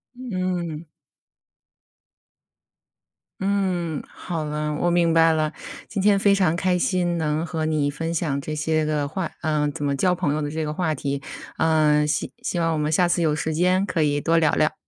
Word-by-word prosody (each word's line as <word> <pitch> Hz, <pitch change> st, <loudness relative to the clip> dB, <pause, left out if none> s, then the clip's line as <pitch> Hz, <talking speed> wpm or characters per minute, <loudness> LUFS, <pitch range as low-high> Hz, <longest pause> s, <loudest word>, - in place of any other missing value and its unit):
嗯。 185 Hz, -9 st, -3 dB, 2.6 s
嗯， 185 Hz, -5 st, -1 dB
好 165 Hz, -3 st, -5 dB
了， 150 Hz, 0 st, -2 dB
我 175 Hz, +3 st, +1 dB
明 170 Hz, -1 st, +3 dB
白 165 Hz, 0 st, +5 dB
了。 155 Hz, -1 st, 0 dB, 0.4 s
今 200 Hz, -, -2 dB
天 205 Hz, 0 st, +4 dB
非 200 Hz, 0 st, +4 dB
常 180 Hz, -5 st, +2 dB
开 180 Hz, 0 st, +1 dB
心 175 Hz, -1 st, 0 dB
能 155 Hz, 0 st, -1 dB
和 160 Hz, -2 st, -3 dB
你 155 Hz, -2 st, +1 dB
分 165 Hz, +3 st, -3 dB
享 155 Hz, -4 st, -1 dB
这 155 Hz, +2 st, -5 dB
些 155 Hz, +1 st, 0 dB
个 150 Hz, -2 st, 0 dB
话 170 Hz, +4 st, -4 dB
呃， 150 Hz, -2 st, +1 dB
怎 145 Hz, -, -6 dB
么 140 Hz, -1 st, 0 dB
交 180 Hz, +6 st, +2 dB
朋 170 Hz, -5 st, 0 dB
友 155 Hz, -, -1 dB
的 145 Hz, -, -2 dB
这 160 Hz, +1 st, -2 dB
个 150 Hz, -, -2 dB
话 160 Hz, -1 st, 0 dB
题。 140 Hz, 0 st, -3 dB, 0.4 s
呃， 155 Hz, -2 st, +3 dB
希 150 Hz, 0 st, -1 dB
希 175 Hz, -, -2 dB
望 165 Hz, -1 st, +1 dB
我 -, -, -1 dB
们 150 Hz, 0 st, 0 dB
下 175 Hz, +2 st, +3 dB
次 175 Hz, 0 st, +1 dB
有 155 Hz, -2 st, +2 dB
时 155 Hz, +1 st, -2 dB
间 180 Hz, +4 st, +2 dB
可 175 Hz, -5 st, -1 dB
以 145 Hz, -1 st, +1 dB
多 165 Hz, +2 st, +2 dB
聊 155 Hz, -3 st, +3 dB
聊。 155 Hz, -, +2 dB
160 Hz, 200 characters per minute, -23 LUFS, 150-175 Hz, 2.6 s, 白